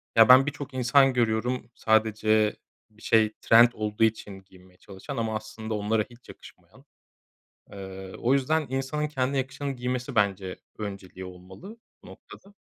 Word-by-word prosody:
ya, 115 +1 +7
ben 130 +1 +8
birçok 145 -2 -6
insan 130 +2 +3
görüyorum 120 +1 -1
sadece 110 -1 +2 0.3
bir 110 0 -24
şey 110 -1 +2
trend 115 +1 +6
olduğu 105 0 -2
için 105 -3 -1
giymeye 95 -1 -21
çalışan 95 0 -9
ama 110 -1 -2
aslında 110 +1 -6
onlara 105 +1 0
hiç 120 0 -19
yakışmayan. - - -16 0.9
Eee, 95 -1 -9
o 120 - +1
yüzden 150 +3 +1
insanın 135 +4 -2
kendi 135 -1 -2
yakışanı 135 +1 -3
giymesi 125 +1 -4
bence 100 -3 0 0.2
önceliği 100 -3 -7
olmalı 95 - -12 0.3
bu - - -16
noktada. 200 +1 -15
110 Hz, 140 wpm, -26 LUFS, 105-130 Hz, 0.9 s, ben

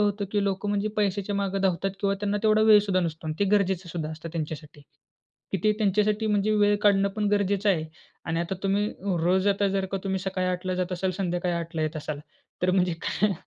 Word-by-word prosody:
होतं 205 0 +1
की 205 -1 +2
लोकं 195 +1 -1
म्हणजे 205 +1 0
पैशाच्या 205 -1 0
मागे 195 -1 -1
धावतात 190 +1 +1
किंवा 200 -1 +1
त्यांना 205 0 0
तेवढा 215 0 +4
वेळ 215 -1 +8
सुद्धा 195 -2 +1
नसतो 160 -2 -4
अन् 155 - -2
ते 200 - +3
गरजेचं 190 -2 -1
सुद्धा 160 -2 -4
असतं 160 +1 -7
त्यांच्यासाठी. 150 -2 -6 0.7
की 195 - +1
ते 215 - +5
त्यांच्यासाठी 210 +1 +1
म्हणजे 210 0 +1
वेळ 205 0 +4
काढणं 200 -1 +4
पण 210 - 0
गरजेचं 205 0 +1
आहे. 165 -5 +2 0.4
आणि 165 +1 -1
आता 170 +2 -2
तुम्ही 200 +2 +1 0.4
रोज 185 +2 +2
आता 200 0 +2
जर 195 0 0
का 195 - 0
तुम्ही 190 -1 0
सकाळी 185 -1 -2
8:00 180 +1 -3
ला 185 - 0
जात 185 0 -2
असाल, 185 +1 -1
संध्याकाळी 180 -1 -1
8:00 170 0 -5
ला 160 - 0
येत 155 +1 -2
असाल, 150 -1 -4 0.4
तर 185 - +3
म्हणजे 180 -1 +2
काय. 210 +1 +1
195 Hz, 220 wpm, -26 LUFS, 175-205 Hz, 0.7 s, वेळ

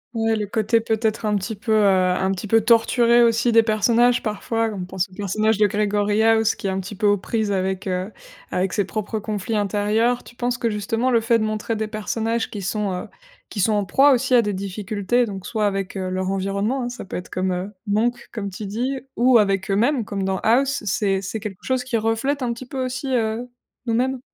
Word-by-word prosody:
Ouais, 225 0 +1
le 210 -2 -2
côté 220 +2 +1
peut-être 220 -1 -1
un 210 - +1
petit 205 +3 -2
peu, 220 +2 -4
heu 215 -1 +4
un 185 0 +2
petit 195 +2 -4
peu 225 +2 +4
torturé 235 +1 +4
aussi 235 +1 +3
des 230 0 +6
personnages 235 +3 +2
parfois 225 +1 -1
donc 205 -3 -6
on - - -4
pense 185 +1 -2
au 185 - -21
personnage 210 +2 0
de 210 - +5
Gregory 210 +1 +1
House 225 -1 +3
qui - - -10
est 190 - +1
un 190 - -2
petit 195 +2 -7
peu 210 +2 -2
aux 205 0 +4
prises 215 0 -1
avec, 190 0 -1
heu 185 +3 -2 0.4
avec 185 +1 -1
ses 205 -3 +1
propres 215 +1 -3
conflits 215 +1 -3
intérieurs. 210 +4 +1
Tu 240 - -15
penses 245 0 -1
que 235 -2 -1
justement 225 +5 -1
le 230 -1 +3
fait 230 +1 +3
de 215 - -1
montrer 215 +1 -2
des 215 0 -2
personnages 225 +1 -2
qui 200 -3 -6
sont, 205 +1 -1
heu - - -10 0.4
qui 205 - -6
sont 215 +3 +3
en 205 -1 +1
proie 275 +9 +5
aussi 255 0 +1
à 240 - +7
des 205 -2 -2
difficultés 205 +4 -1
donc 195 -2 -7
soit 215 -2 0
avec, 195 -1 -3
heu, 185 -1 -3
leur 185 +1 -2
environnement 200 +7 -1
hein, - - -3
ça 245 -4 -8
peut - - -7
être 180 - -6
comme 185 +1 -2
Monk, 230 +4 0
comme 200 -3 -4
tu 200 +3 -7
dis, 250 +7 -2 0.2
ou 245 0 +5
avec 195 -2 +1
eux-mêmes, 230 +4 +2
comme 195 -1 -3
dans 190 -1 -1
House, 265 +5 +2
c'est 195 0 +1
c'est 205 +3 -4
quelque 200 -3 -7
chose 260 -1 0
qui 245 -2 -1
reflète 225 +6 0
un 240 -1 -1
petit 245 +2 -9
peu 260 0 -4
aussi, 255 +1 -3
heu, 230 +1 -1 0.4
nous-mêmes? 250 +3 0
215 Hz, 225 wpm, -22 LUFS, 195-235 Hz, 0.4 s, à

